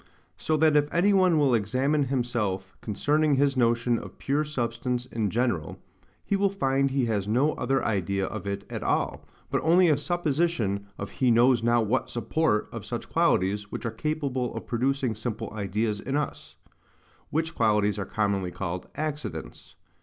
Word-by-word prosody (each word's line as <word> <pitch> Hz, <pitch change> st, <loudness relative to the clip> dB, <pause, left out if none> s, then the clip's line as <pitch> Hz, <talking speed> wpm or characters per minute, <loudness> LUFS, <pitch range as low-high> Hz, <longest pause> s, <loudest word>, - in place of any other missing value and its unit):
So 155 Hz, 0 st, 0 dB
that 155 Hz, 0 st, +4 dB
if 145 Hz, 0 st, +3 dB
any 195 Hz, +4 st, +3 dB
one 185 Hz, -4 st, +4 dB
will 140 Hz, -4 st, +3 dB
examine 130 Hz, +7 st, +1 dB
himself 120 Hz, -8 st, -2 dB
concerning 145 Hz, +8 st, +1 dB
his 140 Hz, 0 st, +2 dB
notion 120 Hz, -1 st, +2 dB
of -, -, -11 dB
pure 145 Hz, +2 st, 0 dB
substance 125 Hz, -3 st, -2 dB
in 115 Hz, -5 st, -2 dB
general, 115 Hz, -8 st, -1 dB, 0.5 s
he 200 Hz, -, +1 dB
will 200 Hz, 0 st, +2 dB
find 135 Hz, -8 st, +1 dB
he 135 Hz, -2 st, +1 dB
has 105 Hz, -4 st, -1 dB
no 130 Hz, +8 st, +2 dB
other 135 Hz, 0 st, 0 dB
idea 100 Hz, -2 st, 0 dB
of 100 Hz, -, -6 dB
it 100 Hz, 0 st, -3 dB
at -, -, -5 dB
all, -, -, -1 dB, 0.3 s
but -, -, +1 dB
only 175 Hz, +2 st, +5 dB
a 150 Hz, -, +4 dB
supposition 150 Hz, -, 0 dB
of 100 Hz, -, -6 dB
he 130 Hz, -, +1 dB
knows 120 Hz, +1 st, +5 dB
not 120 Hz, 0 st, +3 dB
what 105 Hz, -, 0 dB
SUPPORT 120 Hz, 0 st, 0 dB
of -, -, -6 dB
such -, -, -5 dB
qualities 105 Hz, +3 st, +1 dB
which -, -, -5 dB
are 115 Hz, -, -1 dB
capable 135 Hz, -1 st, -2 dB
of -, -, -5 dB
producing 130 Hz, 0 st, 0 dB
simple 110 Hz, 0 st, -5 dB
ideas 105 Hz, +1 st, -1 dB
in 135 Hz, +6 st, -2 dB
us; 150 Hz, -, -4 dB, 0.7 s
which 160 Hz, +1 st, -1 dB
qualities 105 Hz, -2 st, +2 dB
are 100 Hz, -, -2 dB
commonly 100 Hz, -4 st, -1 dB
called 90 Hz, 0 st, -5 dB
accidents. 150 Hz, -, -5 dB
125 Hz, 170 wpm, -27 LUFS, 105-150 Hz, 0.7 s, only